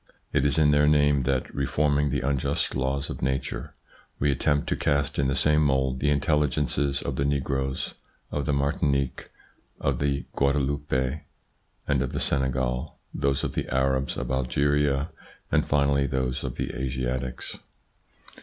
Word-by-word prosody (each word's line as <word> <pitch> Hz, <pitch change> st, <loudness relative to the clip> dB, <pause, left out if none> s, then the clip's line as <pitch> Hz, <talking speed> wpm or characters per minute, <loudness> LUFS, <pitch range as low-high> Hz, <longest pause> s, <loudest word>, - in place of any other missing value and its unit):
It 70 Hz, -, +3 dB
is 70 Hz, -, 0 dB
in 75 Hz, -2 st, +5 dB
their 75 Hz, 0 st, +4 dB
name 75 Hz, -2 st, +4 dB
that, 65 Hz, -2 st, -1 dB
reforming 70 Hz, +1 st, +1 dB
the 65 Hz, -1 st, -1 dB
unjust 70 Hz, -2 st, 0 dB
laws 65 Hz, +1 st, -1 dB
of -, -, -7 dB
nature, 65 Hz, +1 st, -2 dB, 0.4 s
we 70 Hz, 0 st, +2 dB
attempt 70 Hz, +2 st, +1 dB
to -, -, +1 dB
cast 70 Hz, -1 st, 0 dB
in 70 Hz, -, +3 dB
the 65 Hz, -, 0 dB
same 75 Hz, +2 st, +3 dB
mould 65 Hz, -2 st, +1 dB
the 75 Hz, -, +1 dB
intelligences 70 Hz, -1 st, +1 dB
of 70 Hz, -2 st, -3 dB
the 70 Hz, -, +1 dB
negroes 65 Hz, -1 st, -1 dB, 0.4 s
of 70 Hz, -, -2 dB
the -, -, +2 dB
Martinique, 70 Hz, -1 st, 0 dB, 0.5 s
of 70 Hz, -3 st, 0 dB
the 70 Hz, -1 st, 0 dB
Guadeloupe 70 Hz, 0 st, 0 dB, 0.7 s
and 70 Hz, -2 st, +2 dB
of 65 Hz, -, -2 dB
the -, -, -1 dB
Senegal, 65 Hz, -2 st, 0 dB, 0.2 s
those 70 Hz, -1 st, 0 dB
of -, -, -2 dB
the -, -, -3 dB
Arabs 65 Hz, +1 st, +1 dB
of 65 Hz, 0 st, -3 dB
Algeria 70 Hz, +3 st, +1 dB, 0.4 s
and -, -, +2 dB
finally 70 Hz, -1 st, +2 dB
those 65 Hz, -1 st, -1 dB
of -, -, -4 dB
the -, -, -3 dB
Asiatics. 65 Hz, -1 st, -3 dB
70 Hz, 155 wpm, -26 LUFS, 65-70 Hz, 0.7 s, in